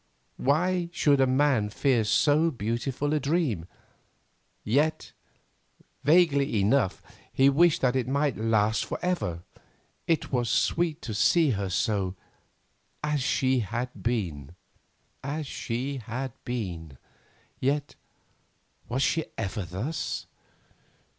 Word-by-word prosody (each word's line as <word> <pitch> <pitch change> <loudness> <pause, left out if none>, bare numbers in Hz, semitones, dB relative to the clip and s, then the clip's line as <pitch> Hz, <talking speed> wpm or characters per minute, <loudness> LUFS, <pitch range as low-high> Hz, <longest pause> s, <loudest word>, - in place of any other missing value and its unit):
Why 175 +5 +1
should 145 -5 +3
a 135 - +4
man 130 -5 +2
fear 125 +1 +2
so 150 +9 +3
beautiful 125 +4 -2
a 155 - +2
dream? 140 - 0 1.0
Yet, 145 +8 0 0.9
vaguely 145 - +4
enough, 100 0 +1 0.3
he 135 +1 +4
wished 165 +3 +4
that 125 -1 +2
it 125 -2 0
might 140 0 +1
last 110 -1 +1
forever, 130 - -2
for - - -25 0.5
it 165 -2 0
was 120 -3 0
sweet 165 -2 +1
to 110 - -4
see 155 - +3
her 100 -3 -2
so—as 105 +9 -4
she 130 0 +2
had 120 +4 -3
been. 85 - -2 0.7
As 150 +3 -3
she 135 +1 -3
had 125 +3 -5
been—yet, 120 - -5 1.0
was 130 +3 0
she 160 -1 +1
ever 105 -2 -3
thus? 110 - -4
130 Hz, 110 wpm, -27 LUFS, 110-150 Hz, 1.0 s, a